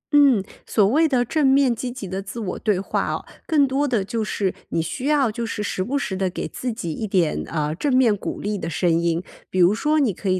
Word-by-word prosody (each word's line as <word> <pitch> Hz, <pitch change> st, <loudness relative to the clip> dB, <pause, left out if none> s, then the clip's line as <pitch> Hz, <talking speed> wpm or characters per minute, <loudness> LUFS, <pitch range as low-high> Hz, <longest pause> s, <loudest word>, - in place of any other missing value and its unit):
嗯， 275 Hz, -9 st, +6 dB, 0.2 s
所 210 Hz, -3 st, +3 dB
谓 310 Hz, +10 st, +4 dB
的 250 Hz, -4 st, +1 dB
正 300 Hz, +3 st, +1 dB
面 270 Hz, -2 st, +4 dB
积 245 Hz, +3 st, -4 dB
极 240 Hz, -6 st, -7 dB
地 190 Hz, +2 st, -3 dB
自 205 Hz, +4 st, -7 dB
我 195 Hz, -5 st, -4 dB
对 210 Hz, -4 st, +1 dB
话 195 Hz, -, -1 dB
啊， -, -, -3 dB, 0.2 s
更 300 Hz, -4 st, +4 dB
多 275 Hz, +2 st, 0 dB
地 225 Hz, -7 st, 0 dB
就 225 Hz, +1 st, -2 dB
是 200 Hz, -2 st, -1 dB, 0.2 s
你 -, -, -1 dB
需 165 Hz, -, -3 dB
要 280 Hz, -6 st, +3 dB
就 235 Hz, +2 st, -4 dB
是 225 Hz, -2 st, -3 dB
时 190 Hz, -2 st, -2 dB
不 275 Hz, +6 st, -1 dB
时 200 Hz, -8 st, -2 dB
地 190 Hz, 0 st, 0 dB
给 180 Hz, -, -4 dB
自 250 Hz, -1 st, -4 dB
己 175 Hz, -8 st, -4 dB
一 215 Hz, +6 st, -4 dB
点， 180 Hz, -5 st, +1 dB
呃， 155 Hz, -1 st, -1 dB
正 280 Hz, -, -1 dB
面 235 Hz, -5 st, +4 dB
鼓 200 Hz, -, -5 dB
励 205 Hz, -1 st, -2 dB
的 165 Hz, -, -4 dB
声 175 Hz, +1 st, +1 dB
音。 170 Hz, +1 st, 0 dB, 0.3 s
比 185 Hz, -, -2 dB
如 180 Hz, +3 st, +6 dB
说 300 Hz, +7 st, +1 dB
你 245 Hz, -8 st, +2 dB
可 190 Hz, +2 st, -4 dB
以 185 Hz, 0 st, +2 dB
215 Hz, 270 characters per minute, -22 LUFS, 185-260 Hz, 0.3 s, 嗯